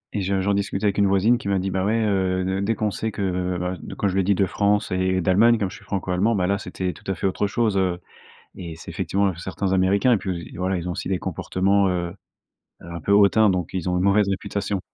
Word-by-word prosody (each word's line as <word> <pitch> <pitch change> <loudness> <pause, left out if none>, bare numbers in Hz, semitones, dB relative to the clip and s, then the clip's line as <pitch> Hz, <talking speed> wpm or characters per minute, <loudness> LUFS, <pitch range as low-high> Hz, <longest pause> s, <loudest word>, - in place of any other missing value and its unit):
et 100 - 0
je 95 0 0
j'en 100 +2 +1
discutais 100 +1 -1
avec 100 0 +1
une 100 - +4
voisine 105 +5 +3
qui - - -7
m'a 100 -1 +1
dit: 95 +1 -2
«Bah 95 0 -1
ouais, 110 +3 +1
heu, 95 -2 +1
D 95 +1 -1
dès 110 +3 0
qu'on 105 0 -1
sait 110 +4 -3
que», 100 - -6
heu, 90 -1 -1
bah, 90 +1 -2 0.2
quand 100 - 0
je 95 - -1
lui 95 - +2
ai - - -1
dit: 100 +2 +2
«De 95 +1 +2
France 105 +2 0
et 95 0 +1
d'Allemagne». 105 +7 +4
Comme 100 -4 -2
je - - -9
suis - - -17
franco-allemand, 95 +3 0
bah 90 -3 +1
là 100 +1 0
c'était 90 -1 -4
tout - - -11
à 95 - -2
fait - - -4
autre 95 +2 0
chose, 110 -1 0
heu 90 -2 0 0.6
et 85 -3 -7
c'est 80 - -10
effectivement 100 -1 0
certains 95 +2 -3
américains 95 +5 +3
et 110 - +3
puis 90 -3 -5
voilà, 95 +1 -1
ils 90 +1 -4
ont - - -1
aussi - - -5
des 95 -1 0
comportements, 100 +1 +1
heu 85 -1 -2 0.7
heu, - - -12
un 85 - -6
peu 90 - -4
hautains, 105 +1 +5
donc 90 -3 -2
ils 90 -1 -3
ont 90 - 0
une 90 - 0
mauvaise 100 0 +3
réputation. 100 +1 -2
95 Hz, 265 wpm, -23 LUFS, 90-100 Hz, 0.7 s, hautains